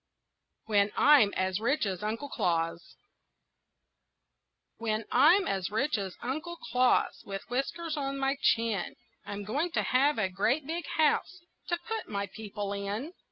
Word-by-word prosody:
WHEN 205 -1 +2
I'M 280 -9 +6
AS 185 0 0
RICH 240 +4 +1
AS 190 -2 -3
UNCLE 225 +7 -3
CLAUS 170 -3 -1 1.8
When 220 -1 -1
I'm 370 +6 +6
as 190 -1 -1
rich 265 +8 0
as 190 -2 -5
Uncle 310 +8 -3
Claus, 250 -2 +1
With 195 -1 -6
whiskers 305 +6 -2
on 275 -1 -2
my 270 0 +1
chin, 225 -5 +1 0.3
I'm 205 0 -5
going 285 - -1
to - - +1
have 275 +4 +3
a 205 -4 +2
great 220 +10 0
big 335 +4 -4
house 315 +4 +2 0.3
To 345 - 0
put 450 -1 -4
my 200 -1 -2
people 205 0 -6
in. 205 - -4
230 Hz, 145 wpm, -30 LUFS, 200-290 Hz, 1.8 s, I'M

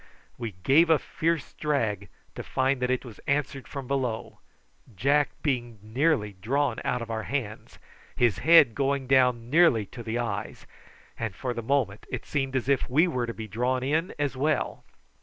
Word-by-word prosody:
We 115 -4 -5
gave 160 - +5
a 160 - +6
fierce 165 -1 -2
drag, 110 -10 -1 0.2
to - - -6
find 130 0 0
that 125 - 0
it 130 +1 0
was 115 -4 -11
answered 140 -3 -1
from 140 -2 -6
below, 125 -4 -3 0.6
Jack 140 +8 +2
being 120 -6 -1
nearly 115 -2 +1
drawn 120 +6 -1
out 125 -3 -1
of 115 - -7
our 110 -1 -2
hands, 110 -5 -5 0.4
his 120 -4 +2
head 155 -5 +6
going 140 +1 0
down 125 -2 +2
nearly 155 -10 +5
to 120 +5 -10
the 115 0 -3
eyes, 120 -1 -4 0.5
and 110 -5 -3
for 125 +4 -3
the 120 - -4
moment 115 -4 -1
it - - -5
seemed 135 -2 -2
as 130 -1 -1
if 140 -2 +1
we 155 +8 +4
were 125 -8 -1
to 115 - -4
be 110 -1 -6
drawn 125 +5 -1
in 155 +6 0
as 145 -2 -1
well. 145 +1 -1
130 Hz, 175 wpm, -27 LUFS, 115-140 Hz, 0.6 s, a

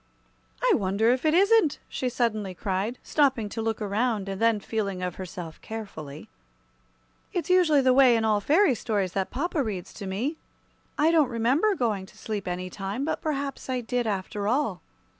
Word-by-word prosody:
"I - - +5
wonder 200 +4 +2
if 255 +4 0
it 310 +1 +4
isn't!" 395 -5 +4
she 255 - -2
suddenly 215 -6 -1
cried, 195 +7 -2
stopping 265 -8 +1
to 225 - -4
look 225 -1 -1
around, 210 0 -1
and 195 +1 -5
then 230 -2 +3
feeling 200 -3 -3
of 180 -2 -3
herself 180 -3 -7
carefully. 160 -10 -8 1.1
"It's 355 0 -1
usually 330 -6 +5
the 260 -1 +4
way 255 -2 +6
in 225 - 0
all 215 -1 +3
the 205 - -15
fairy 340 +1 +5
stories 205 -5 -1
that 190 -1 -1
papa 300 +4 -1
reads 200 -7 -4
to 200 - -7
me. 240 +12 -2 0.6
I 310 +2 +4
don't 310 -6 +4
remember 260 - +2
going 210 - -1
to 215 - -19
sleep 215 -3 -4
any 180 +1 -3
time; 195 +8 -4
but 320 - -2
perhaps 280 -3 -3
I 255 -1 0
did, 240 0 -1
after 200 0 -2
all." 225 - 0
225 Hz, 180 wpm, -26 LUFS, 195-275 Hz, 1.1 s, way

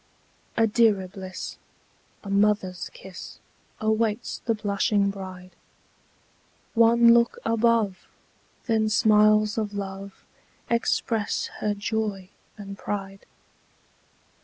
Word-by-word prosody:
A 225 - +5
dearer 210 -4 +3
bliss, 185 0 -8 0.6
a 200 - -8
mother's 200 -3 +1
kiss, 190 -2 -10 0.4
Awaits 220 +1 0
the 230 - +1
blushing 200 -1 +1
bride: 185 -2 -9 1.2
One 235 0 +6
look 235 0 +3
above! 225 -4 +1 0.6
then 220 -2 +1
smiles 215 0 +4
of 205 -2 -3
love 195 0 -7 0.5
Express 230 -2 0
her 210 -1 0
joy 205 -3 -3 0.3
and 200 -1 -9
pride. 195 -1 -5
210 Hz, 90 wpm, -25 LUFS, 195-225 Hz, 1.2 s, One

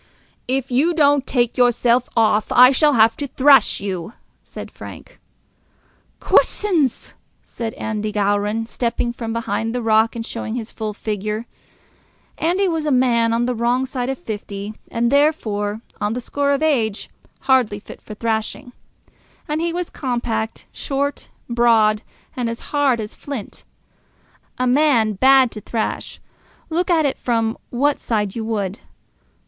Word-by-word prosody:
"If 265 0 -1
you 310 +8 +2
don't 285 -3 +3
take 240 -3 0
yourself 245 0 +3
off, 215 -1 +2
I 250 +1 +8
shall 295 +2 +3
have 225 -1 +5
to 285 - -3
thrash 275 +1 +4
you," 190 0 -5 0.3
said - - -10
Frank. - - -11 1.0
"Coosins!" 335 - +1 0.3
said 225 -2 -6
Andy 215 -1 -3
Gowran, 205 +2 0
stepping 235 0 -2
from 230 -2 -5
behind 225 0 -2
the 250 - -1
rock 220 +1 +3
and 230 -1 -4
showing 230 -1 -5
his 235 -2 -5
full 215 -2 -5
figure. 215 +1 -3 0.9
Andy 365 +4 +1
was 325 -3 -1
a - - +1
man 240 -3 +3
on 230 +1 +1
the 250 - 0
wrong 240 +2 +1
side 255 -1 -3
of 270 - -2
fifty, 205 -2 -6 0.2
and 235 +1 0
therefore, 220 -8 +1 0.2
on 205 +1 0
the 245 - -3
score 280 +3 -1
of 280 +2 +1
age, 230 -9 0 0.3
hardly 255 -6 +2
fit - - -12
for 215 - -9
thrashing. 225 +2 -3 0.8
And 300 +2 -1
he 340 0 0
was 350 0 -4
compact, 235 -4 -3
short, 280 0 -3 0.2
broad, 230 -3 +3 0.3
and 245 -2 -1
as 230 - -8
hard 280 -5 +2
as 215 -1 -5
flint; 275 -8 -7 0.9
a 255 - 0
man 250 -5 +3
bad 260 +3 +5
to 215 - -8
thrash, 225 0 -4 0.5
look 345 +3 0
at 325 -3 +3
it 275 - -1
from 225 -2 0
what 280 +4 +1
side 210 -4 -1
you 230 - -3
would. 205 -3 -2
235 Hz, 150 wpm, -20 LUFS, 220-270 Hz, 1.0 s, I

